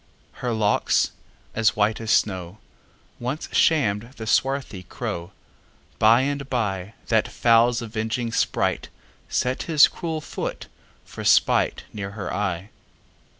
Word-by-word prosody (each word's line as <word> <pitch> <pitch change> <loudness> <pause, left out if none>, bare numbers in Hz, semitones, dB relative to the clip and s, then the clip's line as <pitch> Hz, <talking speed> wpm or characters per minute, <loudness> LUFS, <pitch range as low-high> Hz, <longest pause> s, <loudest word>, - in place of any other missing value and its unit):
Her 125 - -1
locks, 110 -2 +2 0.4
as 115 -1 +2
white 110 +1 +1
as 110 - -5
snow, 95 -3 +1 0.6
Once 130 +6 -4
sham'd 115 -6 +2
the 110 - -6
swarthy 130 -3 0
crow:By 100 +6 -2
and 140 0 -2
byThat 110 0 -1
fowl's 120 +1 +3
avenging 115 +1 -3
spriteSet 115 - -2
his 155 -3 +7
cruel 165 -3 -4
foot - - -5 0.4
for - - -9
spiteNear 100 -2 +1
her 100 -2 -5
eye. 95 0 -2
110 Hz, 105 wpm, -24 LUFS, 105-125 Hz, 0.6 s, his